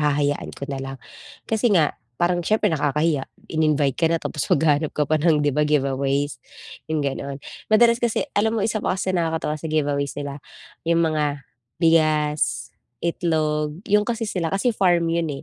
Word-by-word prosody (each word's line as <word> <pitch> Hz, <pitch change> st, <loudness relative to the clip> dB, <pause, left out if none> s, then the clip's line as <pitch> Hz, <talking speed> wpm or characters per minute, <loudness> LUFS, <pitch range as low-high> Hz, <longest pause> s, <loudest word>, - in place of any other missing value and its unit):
hahayaan 145 Hz, -1 st, 0 dB
ko 140 Hz, -, -5 dB
nalang 135 Hz, 0 st, -5 dB, 0.5 s
kasi 225 Hz, +2 st, +2 dB
nga 160 Hz, -6 st, +3 dB, 0.3 s
parang 175 Hz, 0 st, +2 dB
siyempre 215 Hz, 0 st, +2 dB
nakakahiya, 150 Hz, -1 st, 0 dB, 0.3 s
in-invite 150 Hz, -3 st, +1 dB
ka 165 Hz, -, +4 dB
na 165 Hz, -, +2 dB
tapos 150 Hz, -, -3 dB
maghahanap 150 Hz, 0 st, +2 dB
ka 150 Hz, -, +2 dB
pa 155 Hz, 0 st, +2 dB
ng, 155 Hz, -2 st, +3 dB
di 145 Hz, -, +3 dB
ba, 150 Hz, -, +1 dB
giveaways, 140 Hz, -1 st, 0 dB, 0.5 s
yung 155 Hz, -2 st, 0 dB
ganon. 140 Hz, 0 st, -3 dB, 0.3 s
Madalas 235 Hz, +2 st, +5 dB
kasi 240 Hz, +3 st, 0 dB
alam 220 Hz, +2 st, +2 dB
mo 205 Hz, -, 0 dB
isa 215 Hz, 0 st, 0 dB
pa -, -, 0 dB
kasi 185 Hz, 0 st, -1 dB
nakakatawa 160 Hz, -3 st, -1 dB
sa 160 Hz, -, -5 dB
giveaways 145 Hz, -2 st, 0 dB
nila 140 Hz, 0 st, -5 dB, 0.5 s
yung 170 Hz, 0 st, +3 dB
mga 150 Hz, -3 st, -1 dB, 0.4 s
bigas, 150 Hz, -6 st, +2 dB, 0.3 s
itlog, 155 Hz, -3 st, 0 dB
yun 210 Hz, +1 st, +4 dB
kasi 230 Hz, -1 st, -1 dB
sila 175 Hz, -5 st, -1 dB
kasi 200 Hz, +5 st, +1 dB
farm 175 Hz, -5 st, +2 dB
yun 165 Hz, -1 st, 0 dB
155 Hz, 165 wpm, -23 LUFS, 145-175 Hz, 0.5 s, Madalas